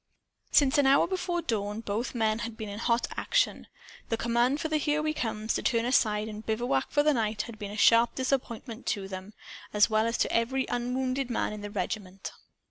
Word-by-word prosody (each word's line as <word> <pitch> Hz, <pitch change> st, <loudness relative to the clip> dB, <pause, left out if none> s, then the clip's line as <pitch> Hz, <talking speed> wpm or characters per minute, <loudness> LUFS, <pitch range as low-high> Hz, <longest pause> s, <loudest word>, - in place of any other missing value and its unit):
Since 280 Hz, -1 st, +4 dB
an 280 Hz, -, +4 dB
hour 275 Hz, +1 st, +5 dB
before 355 Hz, -2 st, -2 dB
dawn, 210 Hz, -1 st, -2 dB
both 225 Hz, +4 st, -3 dB
men 220 Hz, -1 st, +1 dB
had 230 Hz, -1 st, -5 dB
been 215 Hz, -1 st, -5 dB
in 205 Hz, +1 st, -6 dB
hot 235 Hz, +1 st, +1 dB
action. -, -, +1 dB, 0.4 s
The 225 Hz, -, 0 dB
command 240 Hz, +5 st, +1 dB
for 315 Hz, -, -1 dB
the 310 Hz, 0 st, +1 dB
"Here 300 Hz, 0 st, +1 dB
We 310 Hz, 0 st, 0 dB
Comes" 220 Hz, -5 st, -2 dB
to -, -, -1 dB
turn 230 Hz, 0 st, +1 dB
aside 215 Hz, -4 st, +2 dB
and 215 Hz, 0 st, -7 dB
bivouac 220 Hz, -, 0 dB
for 290 Hz, -, +2 dB
the 300 Hz, 0 st, +4 dB
night 215 Hz, -3 st, -1 dB
had 230 Hz, -3 st, -10 dB
been 205 Hz, -1 st, -5 dB
a 210 Hz, -, -7 dB
sharp 230 Hz, +2 st, +5 dB
disappointment 255 Hz, -2 st, -3 dB
to 200 Hz, -4 st, -1 dB
them, 190 Hz, +2 st, -8 dB, 0.4 s
as 210 Hz, +1 st, +4 dB
well 215 Hz, +1 st, +3 dB
as 230 Hz, -, -1 dB
to -, -, 0 dB
every 260 Hz, +3 st, +1 dB
unwounded 255 Hz, +2 st, -1 dB
man 230 Hz, -, -1 dB
in 210 Hz, -, -7 dB
the 205 Hz, -, -5 dB
regiment. 195 Hz, -1 st, -4 dB
230 Hz, 210 wpm, -28 LUFS, 215-260 Hz, 0.4 s, hour